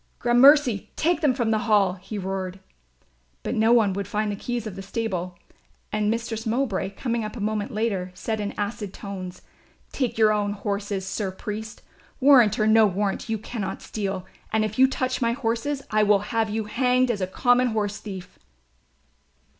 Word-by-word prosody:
"Gramercy, 245 -2 +5
take 335 +1 +1
them 285 -5 +3
from 235 -3 0
the 220 - +2
Hall," 200 -4 +4
he 195 +3 -8
roared. 190 -1 -4 0.8
But - - -2
no 220 +1 +3
one 220 -5 +4
would 200 0 -3
find 210 0 -1
the - - -3
keys 240 +2 -4
of 210 -4 -6
the 195 - -6
stable 195 -4 -3 0.5
and 210 0 0
Mistress 230 0 -2
Mowbray, 225 -5 0
coming 235 -3 -2
up 215 +2 -5
a - - -6
moment 210 0 -1
later, 210 -4 -1
said 220 +4 -3
in 205 -1 -3
acid 205 -1 -4
tones, 185 -3 -7 0.5
"Take 255 -5 -2
your 215 -1 +5
own 205 -1 0
horses, 200 -1 -3
Sir 195 +1 -2
Priest, 215 +3 -7 0.4
warrant 255 -6 +6
or 215 - +3
no 220 0 +6
warrant 200 +3 -2
you 220 - 0
cannot 215 -2 -5
steal, 195 -3 -4 0.3
and 220 0 +2
if 215 +3 -5
you 265 - +8
touch 255 -1 -2
my 235 -1 +2
horses 260 +3 -2
I 215 0 +3
will 210 0 +2
have 225 -1 +1
you 220 +1 -1
hanged 250 +3 +2
as 205 -4 -3
a 185 - 0
common 245 +5 +3
horse 210 -3 -1
thief." 190 -4 -9
215 Hz, 180 wpm, -25 LUFS, 200-235 Hz, 0.8 s, you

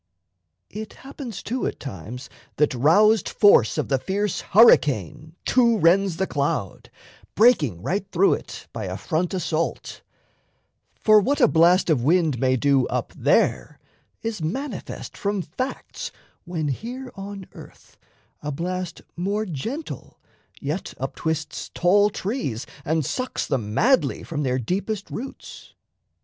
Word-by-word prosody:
It 215 +1 -7
happens 270 -6 -7
too 250 +3 -2
at - - -5
times 125 - -7 0.3
that 150 -1 +2
roused 185 - +4
force 200 - +5
Of - - -1
the 135 -2 +2
fierce 200 +5 -1
hurricane 155 - +4
to 235 -2 +4
rends 185 0 +3
the 190 - +1
cloud, 140 - -2 0.5
Breaking 150 - +4
right 195 +2 -1
through 190 +2 +4
it - - -7
by - - -4
a - - -4
front 170 +1 -1
assault; 165 -2 -2 0.9
For 215 -1 +5
what 275 +8 0
a 245 - +6
blast 175 +1 +4
of 140 -6 +2
wind 160 -3 +2
may 130 0 +2
do 135 0 +2
up - - -3
there - - +1 0.5
Is 225 -5 -3
manifest 235 - -5
from 200 -2 -2
facts 255 - -5 0.3
when 165 -4 -2
here 245 - -5
on 195 -1 -8
earth - - -15 0.4
A 150 - -3
blast 180 +3 -4
more 200 +5 -1
gentle 225 - -6 0.4
yet 150 +7 -4
uptwists 155 +4 -3
tall 205 +4 +4
trees 190 - -3 0.2
And 160 -1 0
sucks 255 - -2
them 110 -6 -2
madly 260 +3 +2
from 155 -3 -4
their 130 -2 0
deepest 195 - -3
roots. 265 +4 -8
180 Hz, 135 wpm, -23 LUFS, 145-215 Hz, 0.9 s, a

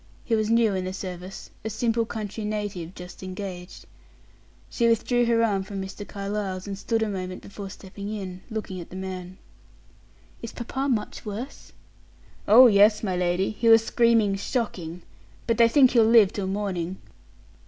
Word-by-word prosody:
He 230 - -2
was 215 -1 0
new 230 -2 +3
in 185 -1 -2
the 185 - -4
service, 185 0 -7
a 220 - -3
simple 225 +1 0
country 215 -1 -5
native, 205 -5 -4
just 180 0 -10
engaged. 185 -1 -7 0.8
She 235 - +1
withdrew 240 +2 +2
her 230 -1 +3
arm 205 -4 +1
from 195 +1 -6
Mr. 195 +2 -7
Carlyle's, 200 -2 -4
and 200 -1 -4
stood 225 +3 -1
a - - -1
moment 185 -2 -5
before 200 -1 -8
stepping 200 +1 -9
in, 185 -4 -6
looking 210 -5 -5
at 170 - -11
the - - -10
man. 185 -1 -6 1.0
"Is 230 - -7
papa 265 +3 -3
much 220 -5 -2
worse?" 215 +6 -7 0.8
"Oh, 235 +5 +9
yes, 210 -1 +5
my 190 -3 -1
lady; 180 +1 0
he 230 +2 +1
was 225 0 +7
screaming 230 -5 +3
shocking. 185 - -3 0.4
But 230 0 0
they 230 - +7
think 260 +1 +5
he'll 235 -3 +5
live 220 -3 +6
till 195 -2 -3
morning." 190 -3 -3
205 Hz, 165 wpm, -25 LUFS, 190-225 Hz, 1.0 s, Oh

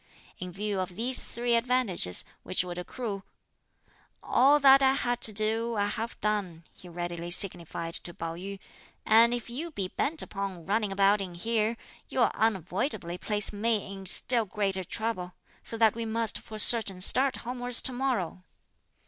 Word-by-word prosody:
In 180 0 -7
view 200 +1 -3
of 185 -1 -5
these 245 +5 +1
three 240 0 -3
advantages, 230 - +1 0.2
which 185 - 0
would 180 -1 -6
accrue, 200 +1 -6 1.0
"All 280 +4 +4
that 275 -1 +6
I 265 0 +4
had 245 -2 -2
to 220 - +7
do, 220 +2 0
I 205 -1 0
have 225 +2 -5
done," 200 -6 -2
she 180 - -14
readily 175 0 -6
signified 170 -2 0
to 175 - -6
Pao 165 -1 -6
yü, 195 +4 -8 0.5
"and 230 +2 +5
if 240 -2 -4
you 280 +8 -5
be 195 - -5
bent 310 - -1
upon 195 -4 -6
running 210 +1 -1
about 200 +1 +2
in 180 -3 -7
here, 225 +4 -1 0.3
you'll - - +1
unavoidably 190 - -2
place 210 -1 +3
me 210 -1 -1
in 195 -1 -10
still 235 +4 +2
greater 195 -1 -2
trouble; 185 -2 -4 0.3
so 230 - 0
that 220 -2 +4
we 230 0 -5
must 225 0 +2
for 215 - -10
certain 215 -4 +5
start 260 +8 +3
homewards 245 0 +3
to 260 - 0
morrow." 245 -9 -2
210 Hz, 165 wpm, -28 LUFS, 185-235 Hz, 1.0 s, to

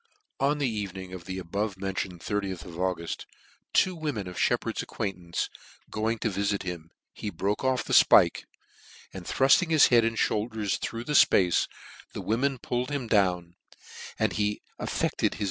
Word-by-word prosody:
399 140 - +3
On 150 - -1
the 125 -7 -1
evening 95 -2 -6
of 90 -2 -8
the 95 0 -5
above 100 +3 -3
mentioned 95 -2 -4
^oth 100 -4 -3
of 90 - -10
Auguft, 90 -3 -2 0.5
two 185 - +3
women 145 - -3
of 90 - -7
Sheppard's - - +1
acquaint 100 -3 -3
ance 85 -1 -3 0.4
going 110 +2 -1
to 110 - -1
vifit 100 +1 -1
him, 85 -3 -6 0.2
he 105 - -5
broke 100 +3 -2
off 130 -1 +1
the - - -4
fpike, - - +6 0.7
and 90 -2 -8
thrufting 135 +6 +4
his 160 -2 +6
head 120 -2 +5
and 115 0 0
moulders 105 -2 0
through 115 0 -4
the 150 - -3
fpace, 90 - +5 0.5
the - - -5
women 130 +5 0
pulk 125 +1 -2
d 145 - -3
him 135 -3 -3
down, 90 -6 +1 0.6
and - - +1
he 105 0 -1 0.2
ef - - -3
fected - - 0
his - - -11
105 Hz, 180 wpm, -27 LUFS, 95-120 Hz, 0.7 s, fpike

